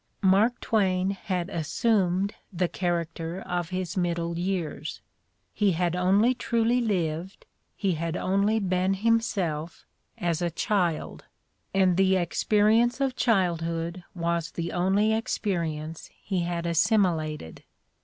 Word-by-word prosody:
Mark 200 +6 +4
Twain 190 -3 +1
had 185 -3 -3
"assumed" 190 +3 +1 0.2
the 180 -1 0
character 170 -1 -2
of 175 -3 -3
his 185 -2 -3
middle 170 -2 -1
years; 175 -5 -3 0.5
he 200 -3 +2
had 175 +1 0
only 195 +7 +3
truly 235 0 +1
lived, 180 -4 -2 0.3
he 195 -2 0
had 165 +1 -2
only 200 +3 +1
been 185 -1 +1
him 230 +3 +3
self, 170 -7 -3 0.3
as 170 -1 -1
a 175 - +1
child, 175 -1 -1 0.5
and 190 -2 +3
the 190 0 +4
experience 215 +7 +2
of 270 -2 0
childhood 170 -5 0
was 170 -1 -1
the 170 0 -4
only 195 +5 +2
experience 165 -8 -2
he 190 -3 -2
had 170 0 -2
assimilated. 165 - +1
180 Hz, 120 wpm, -27 LUFS, 170-200 Hz, 0.5 s, Mark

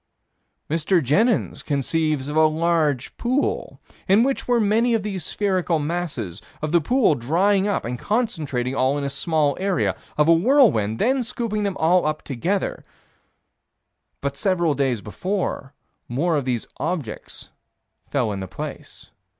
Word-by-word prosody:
Mr. 165 +4 +2
Jenyns 195 - +1
conceives 150 0 -1
of 150 - -4
a 155 0 +6
large 155 -4 0
pool, 255 +4 -1 0.3
in 200 +4 +5
which 270 +1 -1
were 245 -1 +3
many 225 +3 +3
of 220 - -1
these 195 -4 -4
spherical 185 -3 0
masses: 145 - -3 0.2
of 155 0 -3
the 170 -1 +4
pool 245 - +3
drying 185 - +2
up 205 - -1
and 120 +1 -4
concentrating 155 - -1
all 135 +1 +1
in 145 - -3
a 140 - -1
small 150 -2 +1
area; 195 -1 0 0.2
of 150 0 +4
a 165 - +7
whirlwind 170 - +4
then 260 - +2
scooping 225 -3 -2
all 170 0 +3
up 155 0 -2
together 175 +9 -2 1.4
But 140 0 -2
several 175 -1 +1
days 130 -6 0
later, 160 - -3 0.3
more 160 +8 0
of 140 -3 -1
these 125 -3 -1
objects 155 -9 -5 0.6
fell 125 -6 0
in 100 - -4
the 95 - -5
same - - -22
place. - - -8
165 Hz, 150 wpm, -23 LUFS, 140-200 Hz, 1.4 s, a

